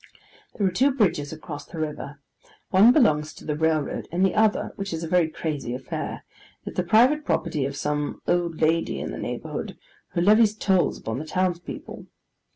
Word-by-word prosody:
There 205 - 0
are 185 - +2
two 260 +10 +3
bridges 175 - +1
across 155 -2 -7
the 170 - -10
river: 150 -2 -5 0.5
one 205 +6 +7
belongs 155 - +3
to - - -13
the 150 - -1
railroad, 155 -2 0
and 180 +3 +2
the 190 - +1
other, 215 -1 +2
which 195 -2 -4
is 165 0 -4
a - - -3
very 170 -1 +3
crazy 145 -6 -4
affair, 130 0 -5 0.4
is - - -6
the - - +1
private 245 - +4
property 150 - -1
of 140 +1 -4
some 150 0 -2
old 175 -2 0
lady 165 +1 +1
in - - -4
the - - -6
neighbourhood, - - -5 0.4
who 170 - 0
levies 210 +3 +5
tolls 190 -4 +1
upon 110 +3 -4
the 155 - -6
townspeople. 180 +1 -3
170 Hz, 180 wpm, -25 LUFS, 150-195 Hz, 0.5 s, one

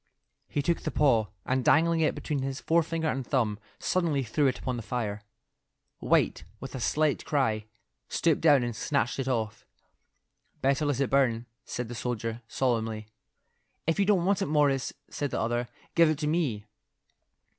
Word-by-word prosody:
He 145 - -2
took 170 +3 +1
the - - -2
paw, 120 -8 +3 0.2
and 130 0 0
dangling 165 +4 +4
it 160 - +2
between 145 -3 -2
his 135 0 -3
forefinger 165 0 +1
and 135 -3 -1
thumb, 115 -6 0 0.2
suddenly 165 -7 0
threw 135 +5 +1
it 130 - 0
upon 130 0 -3
the 120 - -4
fire. 110 -2 -3 0.8
White, - - +2 0.2
with 135 - -8
a 130 - -4
slight 150 +5 +1
cry, 110 -8 0 0.4
stooped 165 -3 +1
down 145 -5 +5
and 120 -2 -3
snatched 140 -1 0
it 135 - -2
off. 110 -4 -2 1.0
"Better 140 +2 +1
let 140 -2 0
it 135 - 0
burn," 120 -4 +2 0.2
said 125 -1 -4
the 120 - -7
soldier, 115 -1 -3
solemnly. 110 -4 -1 0.8
"If 165 +4 +1
you 200 - +4
don't 190 -4 +3
want 200 +1 +2
it, 195 - 0
Morris," 145 -3 +2 0.2
said 145 - -3
the - - -2
other, 120 +1 0 0.3
"give 165 -2 +5
it 155 - +1
to 150 - -3
me." 145 -10 0
135 Hz, 170 wpm, -28 LUFS, 120-155 Hz, 1.0 s, down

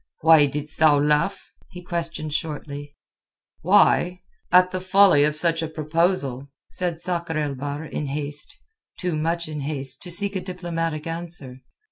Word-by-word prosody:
"Why 160 -2 +6
didst 150 +2 -2
thou 155 -2 +5
laugh?" 150 +7 0 0.2
he 180 0 -11
questioned 170 -3 -4
shortly. 145 -1 -4 0.7
"Why? 180 +1 +3 0.3
At 180 0 +5
the 185 - -3
folly 185 -5 +5
of 150 0 0
such 165 +1 +3
a 160 - -2
proposal," 155 -4 -1 0.2
said 175 -3 -3
Sakr 170 -2 -2
el 150 -2 -1
Bahr 145 +3 -5
in 150 -1 -4
haste, 145 - -2 0.4
too 180 -3 -2
much 165 +2 -1
in 155 -1 -5
haste 140 -2 -4
to 180 - -7
seek 200 +4 -2
a 190 - -1
diplomatic 165 -4 -4
answer. 165 -6 -5
160 Hz, 150 wpm, -23 LUFS, 145-175 Hz, 0.7 s, Why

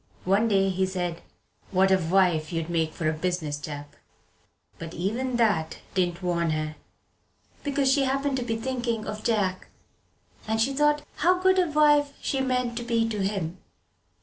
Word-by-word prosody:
One 200 +5 +3
day 195 -2 +3
he 190 0 0
said 175 -2 -3 0.5
"What 190 0 +3
a 190 - +6
wife 170 -3 +2
you'd 165 0 -3
make 160 -2 0
for 155 0 -3
a 155 - +2
business 155 -3 -2
chap!" 145 0 -7 0.8
But 165 0 -7
even 235 +9 -1
that 205 -9 +1 0.2
didn't 180 -1 0
warn 170 -2 0
her, 155 0 -2 0.9
because 275 -2 +2
she 275 -1 +2
happened 275 +1 0
to 250 - -1
be 225 -2 -2
thinking 240 -2 -2
of 215 0 -5
Jack 195 -5 0 0.8
and 220 0 0
she 260 +5 +2
thought 295 +1 +2
how 360 +4 +3
good 375 0 +4
a 355 -3 +2
wife 295 -1 +4
she 270 - -1
meant 250 -2 0
to 240 - -3
be 230 -1 +1
to 215 -2 -3
him. 190 -3 -2
205 Hz, 170 wpm, -26 LUFS, 175-260 Hz, 0.9 s, a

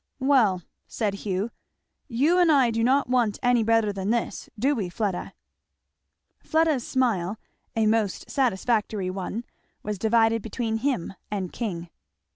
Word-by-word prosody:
"Well," 250 - +3 0.2
said 210 -3 -1
Hugh, 200 +2 -2 0.6
"you 290 +8 +2
and 345 -3 +5
I 265 -5 +4
do 225 0 0
not 270 +3 +3
want 240 -4 +1
any 245 -1 +4
better 225 -2 +2
than 195 0 -3
this, 235 0 -1
do 270 +7 +2
we, 205 -9 -2
Fleda?" 195 -1 -3 1.1
Fleda's 315 -5 +1
smile, 220 -7 0 0.4
a 225 -1 +2
most 215 -3 +1
satisfactory 215 -5 0
one, 195 +4 -4 0.4
was 210 -2 -3
divided 225 +1 +3
between 225 +1 -2
him 245 -7 -1 0.2
and 195 -4 -3
King. 175 -7 -4
225 Hz, 135 wpm, -25 LUFS, 200-250 Hz, 1.1 s, and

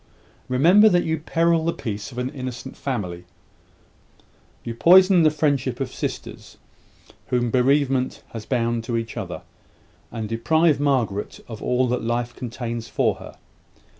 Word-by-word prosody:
remember 175 +12 +5
that 175 -3 +2
you 160 -1 -1
peril 165 +1 +1
the 170 - +1
peace 105 -5 -6
of 125 - -12
an 125 +1 -2
innocent 130 -2 -7
family; 90 -10 -4 1.4
you 115 - -5
poison 185 - +6
the 155 - +5
friendship 150 -3 0
of - - -4
sisters - - -6 0.7
whom 120 -1 0
bereavement 130 0 +1
has 115 -2 -7
bound 115 -1 -1
to 115 0 -2
each 115 -1 -5
other; - - -6 0.7
and 110 -2 -4
deprive 150 +8 +2
Margaret 125 -8 -1
of 110 -2 -8
all 125 +1 +1
that 125 - -1
life 120 +1 -2
contains 120 -2 -5
for - - 0
her. - - -11
125 Hz, 140 wpm, -23 LUFS, 115-155 Hz, 1.4 s, poison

